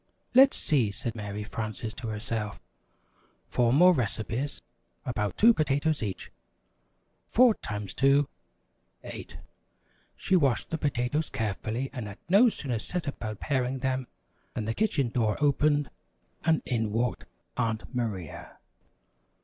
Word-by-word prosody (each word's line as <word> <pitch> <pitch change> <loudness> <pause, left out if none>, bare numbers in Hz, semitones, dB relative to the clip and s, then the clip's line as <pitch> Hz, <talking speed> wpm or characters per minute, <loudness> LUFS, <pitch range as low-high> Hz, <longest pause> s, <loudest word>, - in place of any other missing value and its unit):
"Let's 265 +2 +7
see," 130 -9 +2
said 115 +3 -4
Mary 105 -1 -5
Frances 110 +1 -5
to 120 0 -7
herself, 105 0 -3 0.9
"four 120 -1 +2
more 180 +7 +7
recipes 125 +1 -2 0.4
about 105 -5 -2
two 230 +2 +7
potatoes 150 -2 +1
each. 100 -4 -4 1.0
Four 245 -1 +6
times 105 - -6
two, 140 +1 +4 0.8
eight." - - -8 0.8
She 190 - +1
washed 140 -10 +2
the 165 - -1
potatoes 145 +2 0
carefully, 110 +4 -2
and 120 -6 -5
had 100 - -8
no 210 +7 +7
sooner 130 - -3
set 175 +9 -4
about 110 -6 -4
paring 130 -2 0
them, 130 -1 -1 0.5
than 105 - -2
the 115 - -1
kitchen 155 - +1
door 110 -3 +1
opened, 145 -1 +2 0.5
and 160 -2 +2
in 110 -4 -1
walked 115 +2 -1 0.3
Aunt 115 +2 -2
Maria. 105 - -4
125 Hz, 125 wpm, -28 LUFS, 110-145 Hz, 1.0 s, Let's